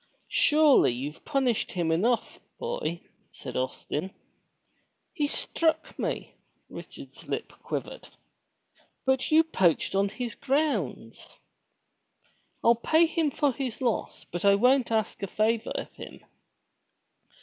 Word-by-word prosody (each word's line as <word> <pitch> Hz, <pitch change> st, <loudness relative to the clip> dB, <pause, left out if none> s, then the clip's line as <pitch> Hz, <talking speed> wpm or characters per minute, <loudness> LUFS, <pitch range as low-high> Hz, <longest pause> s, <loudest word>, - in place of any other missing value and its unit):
Surely 300 Hz, -, +5 dB
you've 140 Hz, +6 st, -6 dB
punished 265 Hz, -6 st, 0 dB
him 170 Hz, -3 st, 0 dB
enough, 225 Hz, +9 st, +1 dB, 0.2 s
boy," 470 Hz, -, -3 dB, 0.3 s
said -, -, -8 dB
Austin. 145 Hz, +7 st, -3 dB, 1.0 s
''He 295 Hz, -5 st, +1 dB
struck 320 Hz, +2 st, -1 dB
me!" -, -, -3 dB, 0.4 s
Richard's -, -, -11 dB
lip -, -, -3 dB
quivered. -, -, -5 dB, 1.0 s
''But 265 Hz, 0 st, +1 dB
you 315 Hz, +1 st, +6 dB
poached 190 Hz, -, +1 dB
on 200 Hz, +1 st, +2 dB
his 240 Hz, +1 st, -5 dB
grounds." 255 Hz, -, -1 dB
• -, -, -23 dB, 1.3 s
"I'll 235 Hz, -, +7 dB
pay 315 Hz, +8 st, +3 dB
him 325 Hz, -2 st, 0 dB
for 285 Hz, 0 st, +1 dB
his 255 Hz, -2 st, -4 dB
loss, 240 Hz, -4 st, -2 dB
but 175 Hz, -, -6 dB
I 200 Hz, 0 st, +6 dB
won't 250 Hz, +3 st, +3 dB
ask 220 Hz, -1 st, 0 dB
a 195 Hz, -, -2 dB
favor 220 Hz, +3 st, 0 dB
of -, -, -5 dB
him." -, -, -11 dB
235 Hz, 120 wpm, -28 LUFS, 190-290 Hz, 1.3 s, I'll